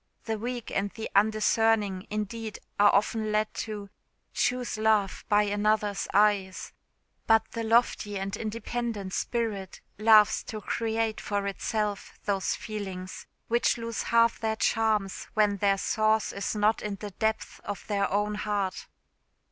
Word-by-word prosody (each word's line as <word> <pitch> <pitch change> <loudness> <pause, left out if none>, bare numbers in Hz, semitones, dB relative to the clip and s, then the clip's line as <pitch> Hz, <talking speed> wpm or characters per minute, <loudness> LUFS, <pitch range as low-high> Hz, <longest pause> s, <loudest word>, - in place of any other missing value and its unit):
The 220 -1 -3
weak 240 +1 -4
and 200 +1 0
the 220 +2 -7
undiscerning, 215 -2 +2
indeed, 215 +1 -4 0.2
are 205 0 +7
often 215 +2 +1
led 215 0 0
to 205 -2 -5 0.4
"choose 250 0 0
love 215 -3 +2
by 210 0 +5
another's 205 0 0
eyes;" 200 -2 +2 0.5
but 225 0 +5
the 230 - -3
lofty 225 -2 +2
and 195 +1 -3
independent 220 -2 -4
spirit 215 -6 -2 0.2
loves 215 -1 +6
to 215 - -5
create 225 0 -1
for 200 -1 -2
itself 205 +1 -3
those 195 -2 0
feelings 190 -4 -6 0.2
which 235 +1 +2
lose 230 -1 -3
half 230 0 +3
their 220 -1 -1
charms 215 -3 0
when 210 -2 +3
their 200 0 +2
source 215 +2 +1
is 200 +2 -3
not 210 +1 +2
in 210 -1 -3
the 205 +1 -7
depths 220 +3 -2
of 205 - -6
their 200 -2 0
own 205 +1 +1
heart. 205 -3 -2
210 Hz, 140 wpm, -28 LUFS, 200-225 Hz, 0.5 s, are